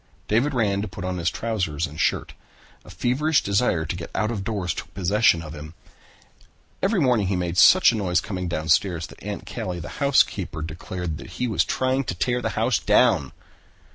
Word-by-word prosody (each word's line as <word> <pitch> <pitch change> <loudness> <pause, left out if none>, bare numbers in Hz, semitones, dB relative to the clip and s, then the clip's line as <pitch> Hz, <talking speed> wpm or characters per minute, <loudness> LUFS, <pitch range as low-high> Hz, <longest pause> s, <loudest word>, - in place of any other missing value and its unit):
David 130 +7 +1
ran 100 -4 +1
to 105 - -3
put 90 0 -7
on 90 -1 -3
his 85 - +1
trousers 90 -9 -2
and 75 0 -10
shirt. - - 0 0.5
A - - -15
feverish 125 - +1
desire 100 -5 +1
to 80 - -3
get 85 -1 -7
out 110 +3 0
of 105 -4 -3
doors 95 -5 -2
took - - -8
possession 100 -2 +3
of 75 -1 -8
him. 75 +2 -9 1.1
Every 195 +1 +2
morning 125 - +2
he 95 - 0
made 90 -1 -2
such 185 - +7
a - - -3
noise 90 -4 +1
coming 90 -3 -4
down 80 -2 -3
stairs 85 0 +2
that - - -14
Aunt - - -6
Callie, 90 -1 -5
the 85 - -7
housekeeper, 140 - +2
declared 85 0 -5
he 125 +10 -4
was 95 -8 +2
trying 130 +1 0
to 90 - -3
tear 125 +7 0
the - - -1
house 115 0 +2
down. - - +3
95 Hz, 195 wpm, -24 LUFS, 85-115 Hz, 1.1 s, such